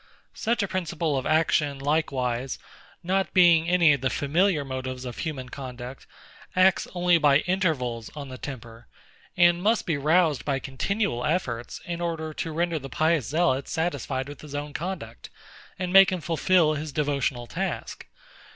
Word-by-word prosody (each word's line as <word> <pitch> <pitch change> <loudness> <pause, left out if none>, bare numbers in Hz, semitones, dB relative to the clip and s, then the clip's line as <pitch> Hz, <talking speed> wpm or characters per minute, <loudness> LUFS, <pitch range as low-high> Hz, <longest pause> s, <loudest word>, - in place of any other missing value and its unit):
Such 235 -1 0
a - - -1
principle 170 -4 -2
of 130 - -2
action 155 -2 +2
likewise, 135 -4 -1 0.5
not 190 +2 -1
being 170 -2 +5
any 170 -4 +5
of 140 - -2
the 130 - +1
familiar 155 +2 +1
motives 130 -1 -5
of 125 - -7
human 140 -6 -4
conduct, 125 -1 -8 0.5
acts 185 +1 +4
only 175 -1 +3
by 145 -1 +4
intervals 150 - -1
on 145 -2 -6
the 130 -1 -9
temper; 120 -4 -9 0.5
and 175 -1 +5
must 220 +4 +2
be 160 -4 0
roused 155 0 +2
by 140 -2 0
continual 135 - -2
efforts, 120 -8 -2
in 170 0 -4
order 160 -2 -3
to 165 - -4
render 170 0 -1
the 135 -1 -8
pious 155 -1 +1
zealot 145 -3 +1
satisfied 140 -5 -2
with 145 0 -10
his 145 -2 -9
own 145 0 -4
conduct, 185 +4 -6 0.5
and 180 -1 -3
make 195 0 +8
him 185 - -1
fulfil 165 0 +2
his 150 0 -4
devotional 140 -4 -1
task. 115 - -5
150 Hz, 160 wpm, -26 LUFS, 135-175 Hz, 0.5 s, make